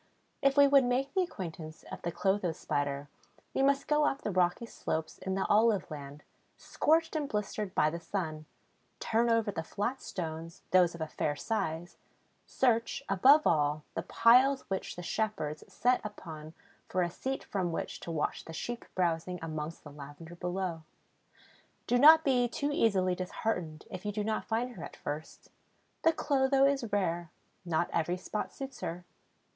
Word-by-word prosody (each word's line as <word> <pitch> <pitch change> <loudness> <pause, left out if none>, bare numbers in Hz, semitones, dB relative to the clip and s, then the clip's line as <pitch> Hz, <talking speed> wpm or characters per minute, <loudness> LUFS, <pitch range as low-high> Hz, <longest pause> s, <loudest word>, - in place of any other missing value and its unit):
If 275 0 +3
we 285 0 +8
would 275 -1 +6
make 260 +3 0
the 380 - +3
acquaintance 165 - -6
of - - -6
the 170 - -2
Clotho 190 -2 0
Spider 145 -2 -2 0.5
we - - +1
must 275 0 +2
go 300 0 +3
up 275 -1 -1
the 210 - -1
rocky 180 +4 +1
slopes 160 -7 -4
in 190 0 -3
the 195 - 0
olive 210 -6 +3
land, 145 -1 -8 0.3
scorched 320 +1 +1
and 295 -3 -1
blistered 210 -1 -3
by 155 - +3
the 170 - -4
sun, 160 -4 -4 0.5
turn 230 +1 +1
over 230 -2 +2
the 160 - -3
flat 210 +10 -3
stones, 165 0 -6
those 180 -2 +5
of 170 - -9
a 160 - -1
fair 150 -1 -1
size, 170 -3 -3 0.5
search, 240 +1 +1
above 275 +11 +6
all, 150 -1 +2
the - - -2
piles 260 +4 +5
which 190 - -3
the 175 - -7
shepherds 160 -7 -2
set 250 +1 +2
up 210 -1 -7 0.7
for 185 - +1
a 175 - -2
seat 265 +9 -4
from 185 -4 -2
which - - -4
to - - -8
watch 160 -3 -2
the 165 - -8
sheep 240 +8 -5
browsing 180 0 0
amongst 155 0 -5
the 145 - -10
lavender 145 +4 -10
below. 180 -1 -3 1.0
Do 245 - +2
not 315 +3 +9
be 250 -3 +3
too 285 +5 -2
easily 190 -8 +2
disheartened 180 -3 -3
if 185 -2 -6
you 210 - -2
do 210 0 -2
not 215 0 -1
find 235 +3 -1
her - - -8
at - - -8
first. 150 +2 -7 0.5
The 325 - +5
Clotho 275 -3 +3
is 270 -6 +1
rare; 175 -4 0 0.4
not 170 0 +1
every 170 +2 0
spot 210 +3 -4
suits 270 -1 -8
her. 175 +2 -5
190 Hz, 170 wpm, -31 LUFS, 165-245 Hz, 1.0 s, not